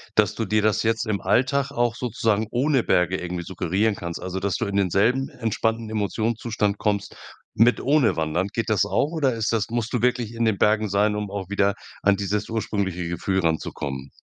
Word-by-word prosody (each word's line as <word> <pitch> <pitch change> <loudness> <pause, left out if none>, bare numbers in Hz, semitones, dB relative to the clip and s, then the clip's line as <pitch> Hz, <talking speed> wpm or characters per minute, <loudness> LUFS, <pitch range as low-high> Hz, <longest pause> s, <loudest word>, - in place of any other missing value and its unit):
dass 105 -1 +3
du 115 - -2
dir 105 +2 +2
das 110 +1 +2
jetzt 115 +1 +1
im 105 -2 0
Alltag 140 +2 +1
auch 120 -3 0
sozusagen 110 -3 0
ohne 130 0 +2
Berge 90 +1 +2
irgendwie 90 -1 -4
suggerieren 95 +4 0
kannst? 85 -1 -6
Also, 95 +1 -4
dass 100 0 -1
du - - -1
in 100 0 -2
denselben 105 +8 +2
entspannten 115 -1 -2
Emotionszustand 110 0 -1
kommst 100 -1 -1 0.4
mit 120 +3 +4
ohne 140 -4 +3
Wandern. 80 +4 0
Geht 115 -1 -2
das 100 -2 +3
auch 120 - 0
oder 140 -7 +1
ist 110 -2 -1
das 110 -2 0
musst 120 -1 -2
du 125 - 0
wirklich 120 -2 0
in 115 0 0
den 110 -3 +2
Bergen 105 0 +3
sein, 105 +2 +2
um 105 -1 -3
auch 95 -1 -5
wieder 100 0 +2 0.3
an 100 0 +4
dieses 105 +1 -2
ursprüngliche 100 -6 -2
Gefühl 95 +2 -1
ranzukommen? 70 -5 -3
105 Hz, 195 wpm, -24 LUFS, 95-115 Hz, 0.4 s, mit